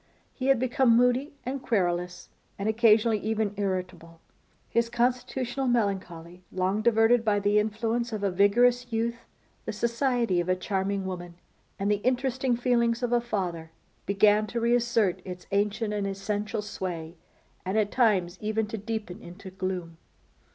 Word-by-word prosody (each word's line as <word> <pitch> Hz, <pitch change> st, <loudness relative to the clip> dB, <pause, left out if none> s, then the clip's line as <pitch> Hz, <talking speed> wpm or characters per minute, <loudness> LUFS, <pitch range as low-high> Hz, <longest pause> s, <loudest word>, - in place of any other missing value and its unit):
He 260 Hz, -, -3 dB
had 270 Hz, -1 st, +5 dB
become 250 Hz, -1 st, +3 dB
moody 250 Hz, +4 st, +2 dB
and 265 Hz, +2 st, -3 dB
querulous, 180 Hz, -6 st, -1 dB, 0.3 s
and 200 Hz, -, -3 dB
occasionally 220 Hz, 0 st, +4 dB
even 215 Hz, -1 st, -1 dB
irritable. 185 Hz, -4 st, -4 dB, 0.5 s
His 235 Hz, 0 st, 0 dB
constitutional 250 Hz, +2 st, -1 dB
melancholy, 185 Hz, -7 st, -2 dB
long 190 Hz, +3 st, 0 dB
diverted 225 Hz, +1 st, +4 dB
by 210 Hz, -2 st, +2 dB
the 205 Hz, +1 st, +3 dB
influence 225 Hz, +3 st, -1 dB
of 215 Hz, -2 st, -4 dB
a 200 Hz, -, +1 dB
vigorous 240 Hz, +6 st, +3 dB
youth, 235 Hz, +1 st, -2 dB, 0.4 s
the -, -, -2 dB
society 235 Hz, -3 st, 0 dB
of 175 Hz, +1 st, -2 dB
a 185 Hz, -, +3 dB
charming 195 Hz, +1 st, -2 dB
woman, 175 Hz, -2 st, -6 dB, 0.4 s
and 200 Hz, +1 st, 0 dB
the 205 Hz, -, +2 dB
interesting 255 Hz, +2 st, 0 dB
feelings 235 Hz, -1 st, +1 dB
of 245 Hz, 0 st, 0 dB
a 240 Hz, -, +3 dB
father, 180 Hz, -8 st, -3 dB, 0.4 s
began 210 Hz, +2 st, +4 dB
to 235 Hz, -, -3 dB
reassert 235 Hz, -4 st, +1 dB
its 180 Hz, -1 st, -8 dB
ancient 210 Hz, +2 st, 0 dB
and 205 Hz, -1 st, -1 dB
essential 205 Hz, +2 st, -3 dB
sway, 175 Hz, -5 st, -5 dB, 0.5 s
and 190 Hz, +3 st, -2 dB
at 210 Hz, -2 st, +1 dB
times 195 Hz, -7 st, +2 dB
even 215 Hz, +1 st, 0 dB
to 220 Hz, +1 st, -6 dB
deepen 215 Hz, -3 st, -5 dB
into 185 Hz, +2 st, -11 dB
gloom. 185 Hz, -3 st, -4 dB
215 Hz, 150 wpm, -27 LUFS, 190-235 Hz, 0.5 s, had